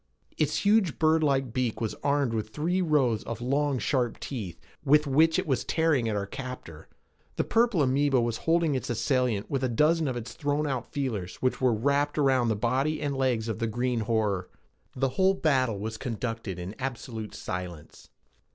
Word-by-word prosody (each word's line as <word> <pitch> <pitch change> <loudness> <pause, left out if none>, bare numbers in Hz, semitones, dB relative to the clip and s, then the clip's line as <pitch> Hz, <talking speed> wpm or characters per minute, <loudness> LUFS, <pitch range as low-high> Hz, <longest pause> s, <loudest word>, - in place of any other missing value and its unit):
Its - - 0
huge 200 -6 +3
birdlike 150 -6 +2
beak 125 -4 -1
was 110 -2 -2
armed 140 -4 +1
with 110 -1 -2
three 170 +10 -1
rows 140 -10 +2
of 115 - -5
long 140 +3 0
sharp 125 -2 0
teeth 105 -11 -6 0.2
with 150 +1 +4
which 160 +4 +4
it 185 - 0
was 135 -6 0
tearing 155 -8 +1
at 105 - -1
our 100 -1 -1
captor. 100 - -8 0.5
The - - +1
purple 230 -8 +2
amoeba 135 0 +2
was 115 -1 0
holding 165 -2 +3
its 130 - -3
assailant 120 -2 0
with 135 -2 -2
a 130 - +1
dozen 155 +6 +2
of 130 -2 -2
its 120 0 -6
thrown 145 +1 -1
out 130 -5 -3
feelers 110 -11 -3
which 130 +1 -1
were 130 -1 +4
wrapped 140 +6 +1
about 135 -4 +3
the 110 - +1
body 130 +8 0
and 145 -2 -2
legs 125 -4 0
of 110 - -3
the 115 - 0
green 120 +2 -1
horror. 105 -4 0 0.5
The 135 +1 +1
whole 190 +6 +2
battle 130 - +1
was 110 +2 -4
conducted 115 -5 -4
in 90 +3 -6
absolute 120 -4 -5
silence. 90 -4 -7
130 Hz, 180 wpm, -27 LUFS, 115-145 Hz, 0.5 s, with